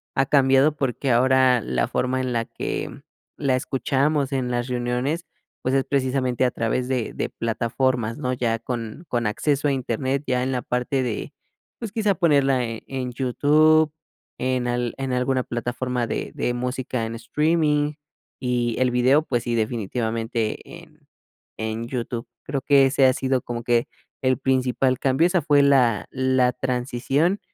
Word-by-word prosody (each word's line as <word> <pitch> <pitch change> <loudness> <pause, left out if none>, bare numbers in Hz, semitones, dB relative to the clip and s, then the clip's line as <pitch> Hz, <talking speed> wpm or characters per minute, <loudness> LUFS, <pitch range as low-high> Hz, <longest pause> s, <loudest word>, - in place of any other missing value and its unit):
ha 135 - +3
cambiado 135 +1 +4
porque 135 -1 -1
ahora 130 0 +4
la 60 - -1
forma 130 +1 -1
en 130 -1 -2
la 115 -1 0
que - - -4 0.5
la 135 -3 +1
escuchamos 135 +3 0
en 130 -2 -1
las 120 0 -1
reuniones, 125 +6 -1 0.4
pues, 130 +1 0
es 135 - +3
precisamente 130 -2 0
a 125 - +3
través 120 +2 -1
de 130 -3 -2
de - - -3
plataformas, 115 0 -1
¿no? 130 -3 -2
Ya 120 -2 0
con 115 +5 -6
con 120 -2 0
acceso 145 +7 0
a - - +2
Internet, 130 +2 -1
ya 125 -1 0
en 130 - -1
la 125 -1 -1
parte 125 +2 -1
de, 115 -4 -4 0.5
pues, 230 -4 -5
quizá 210 -2 +1
ponerla 140 -7 +3
en 115 -1 -5
en 130 -2 -4
YouTube, 150 +5 +3 0.5
en 130 -1 0
al 120 -1 -1
en 135 -1 -3
alguna 130 +1 +1
plataforma 120 0 -2
de - - -3
de 120 - -1
música 125 -1 -2
en 115 +1 -5
streaming 150 +5 +1 0.5
y 120 -2 0
el 130 -1 +3
video, 130 +4 +4
pues, 120 -6 -1
sí, 120 - -2
definitivamente 115 0 -1 0.2
en 155 -3 -20 0.5
en 110 +1 -3
YouTube. 120 -1 -4 0.2
Creo 140 -1 -3
que 140 0 +5
ese 135 0 +3
ha 130 - +5
sido 130 0 0
como 120 0 -5
que 120 0 +2 0.3
el 130 -1 +2
principal 130 0 +1
cambio, 135 +5 +3
esa 180 -1 +1
fue 145 -2 +4
la 125 -7 +3
la 130 -1 +2
transición 130 +8 0
130 Hz, 160 wpm, -23 LUFS, 120-135 Hz, 0.5 s, que